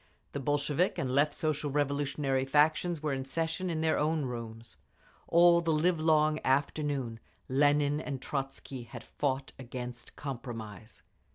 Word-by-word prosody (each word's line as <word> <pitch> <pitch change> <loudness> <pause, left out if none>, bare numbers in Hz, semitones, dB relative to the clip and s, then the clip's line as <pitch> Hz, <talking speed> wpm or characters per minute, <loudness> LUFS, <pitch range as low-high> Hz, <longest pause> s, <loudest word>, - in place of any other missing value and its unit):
The 140 - -4
Bolshevik 145 +5 +1
and 130 - -1
Left 145 +2 +4
Social 150 -2 -1
Revolutionary 140 -1 0
factions 155 +4 +2
were 150 -2 0
in 135 0 -2
session 165 +6 -2
in 160 -2 -1
their 160 0 +2
own 155 -1 +1
rooms. 115 -2 -7 0.5
All 170 0 +6
the 165 -1 0
livelong 155 -1 +3
afternoon 135 -3 0 0.3
Lenin 145 +2 +3
and 140 -4 -4
Trotzky 135 -1 -4
had - - -9
fought 135 -1 -2
against 125 -1 -7
compromise. 115 -5 -7
145 Hz, 130 wpm, -31 LUFS, 130-155 Hz, 0.5 s, All